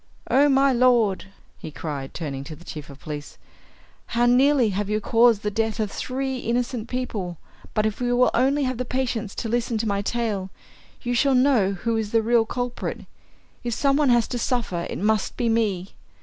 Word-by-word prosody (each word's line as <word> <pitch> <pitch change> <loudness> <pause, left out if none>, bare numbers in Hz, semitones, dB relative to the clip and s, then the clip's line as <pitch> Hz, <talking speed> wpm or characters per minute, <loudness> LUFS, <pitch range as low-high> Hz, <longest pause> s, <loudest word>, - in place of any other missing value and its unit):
"Oh, 285 +2 +5
my 270 0 +4
lord," 235 -6 +3 0.3
he - - -7
cried, 145 -3 -6
turning 140 -5 -4
to 155 - -8
the 175 - -16
chief 150 -2 -8
of 140 0 -12
police, 150 -1 -7 0.8
"how 240 - +4
nearly 255 0 +4
have 200 +1 -2
you 210 0 +1
caused 230 -1 +3
the 210 - -1
death 225 +1 -1
of 210 -2 -1
three 265 0 -3
innocent 240 -1 -2
people! 210 -9 -3 0.4
But 215 - +2
if 215 +2 -2
you 245 0 +1
will 250 - +4
only 275 +4 +2
have 255 -2 -2
the - - 0
patience 240 -4 -2
to 230 - -3
listen 235 0 0
to 220 +1 -1
my 200 -1 0
tale, 210 -3 -2 0.5
you 245 -1 -1
shall 270 +2 +3
know 250 -7 +3
who 225 +4 -1
is 220 -1 -3
the 225 -1 +3
real 230 0 +3
culprit. 245 0 -3 0.6
If 240 -2 -2
some 275 +1 +2
one 290 -2 +3
has 240 -2 +4
to 245 - -3
suffer, 230 -9 -1
it - - -4
must 215 +1 0
be 240 -2 +1
me! 205 -5 0
230 Hz, 195 wpm, -24 LUFS, 200-250 Hz, 0.8 s, Oh